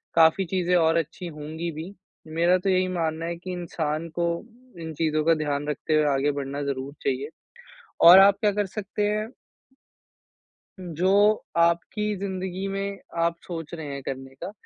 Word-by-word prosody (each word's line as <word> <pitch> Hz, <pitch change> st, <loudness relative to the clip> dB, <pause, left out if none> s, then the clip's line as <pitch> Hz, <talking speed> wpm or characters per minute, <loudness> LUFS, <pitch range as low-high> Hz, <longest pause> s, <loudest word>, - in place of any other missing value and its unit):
काफ़ी 165 Hz, +3 st, +5 dB
चीज़े 180 Hz, 0 st, 0 dB
और 165 Hz, -1 st, +4 dB
अच्छी 165 Hz, +3 st, -3 dB
होंगी 160 Hz, +2 st, -5 dB
भी। 160 Hz, +5 st, -7 dB, 0.3 s
मेरा 170 Hz, +3 st, +3 dB
तो 195 Hz, +2 st, -1 dB
यही 185 Hz, 0 st, +2 dB
मानना 165 Hz, -2 st, -2 dB
है 170 Hz, 0 st, -3 dB
कि 185 Hz, +2 st, -7 dB
इंसान 165 Hz, -3 st, -3 dB
को 170 Hz, -, +2 dB, 0.6 s
इन 160 Hz, -1 st, -6 dB
चीज़ों 155 Hz, 0 st, 0 dB
का 165 Hz, -, +5 dB
ध्यान 145 Hz, -1 st, -2 dB
रखते 150 Hz, +1 st, -2 dB
हुए 155 Hz, -, +4 dB
आगे 140 Hz, +2 st, +1 dB
बढ़ना 140 Hz, 0 st, -4 dB
ज़रूर 140 Hz, 0 st, -4 dB
चाहिए। 135 Hz, +2 st, -1 dB, 0.8 s
और 180 Hz, +2 st, +11 dB
आप 195 Hz, 0 st, +7 dB
क्या 210 Hz, -, +3 dB
कर 205 Hz, 0 st, 0 dB
सकते 205 Hz, +1 st, -4 dB
हैं 215 Hz, +1 st, -1 dB, 1.5 s
जो 185 Hz, +5 st, +3 dB, 0.3 s
आपकी 170 Hz, +5 st, +1 dB
ज़िंदगी 190 Hz, -1 st, -4 dB
में 195 Hz, 0 st, -3 dB, 0.2 s
आप 170 Hz, 0 st, +1 dB
सोच 165 Hz, -3 st, -6 dB
रहे 160 Hz, -2 st, -6 dB
हैं 140 Hz, -1 st, -6 dB
करने 135 Hz, 0 st, -6 dB
का, 180 Hz, +8 st, -7 dB
170 Hz, 165 wpm, -25 LUFS, 155-185 Hz, 1.5 s, और